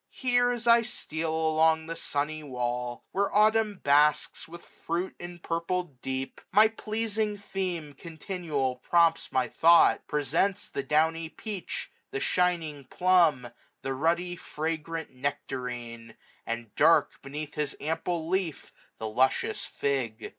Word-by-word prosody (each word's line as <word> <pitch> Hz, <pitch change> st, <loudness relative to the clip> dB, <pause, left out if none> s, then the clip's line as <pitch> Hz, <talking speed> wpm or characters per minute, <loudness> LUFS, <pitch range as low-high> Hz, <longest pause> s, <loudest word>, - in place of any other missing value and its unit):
Here, 245 Hz, -1 st, +2 dB
as 240 Hz, -1 st, -2 dB
I 235 Hz, 0 st, +7 dB
steal 165 Hz, -8 st, -4 dB
along 160 Hz, 0 st, +2 dB
the 165 Hz, +1 st, -5 dB
sunny 150 Hz, 0 st, -2 dB
wall. 125 Hz, -3 st, -3 dB
Where 200 Hz, +1 st, 0 dB
autumn 215 Hz, -1 st, +3 dB
basks, 150 Hz, +1 st, +3 dB
with 170 Hz, +1 st, -11 dB
fruit 175 Hz, +3 st, -4 dB
empurpled 175 Hz, -3 st, -4 dB
deep. 130 Hz, 0 st, -4 dB
My 215 Hz, +2 st, +6 dB
pleasing 220 Hz, -1 st, -2 dB
theme 180 Hz, -7 st, -4 dB
continual 155 Hz, -4 st, -3 dB
prompts 165 Hz, +4 st, +2 dB
my 130 Hz, -1 st, +1 dB
thought: 170 Hz, +8 st, +5 dB
Presents 150 Hz, +8 st, 0 dB
the -, -, -3 dB
downy 160 Hz, +4 st, +1 dB
peach; 200 Hz, +3 st, -6 dB, 0.2 s
the 410 Hz, -, -3 dB
shining 170 Hz, -, 0 dB
plum; 175 Hz, -4 st, +3 dB
6j^ 120 Hz, -1 st, -10 dB, 0.3 s
The 135 Hz, -, -2 dB
ruddy, 170 Hz, +5 st, 0 dB
fragrant 160 Hz, +1 st, -4 dB
nectarine; 125 Hz, -4 st, -5 dB, 0.3 s
and 115 Hz, -1 st, -4 dB
dark. 165 Hz, +3 st, +4 dB
Beneath 145 Hz, +2 st, -6 dB
his 150 Hz, -1 st, -3 dB
ample 160 Hz, +2 st, -2 dB
leaf, 180 Hz, -5 st, -2 dB, 0.2 s
the 110 Hz, -, -4 dB
luscious 130 Hz, +5 st, +1 dB
fig. 130 Hz, -6 st, -2 dB
160 Hz, 125 wpm, -28 LUFS, 140-180 Hz, 0.3 s, I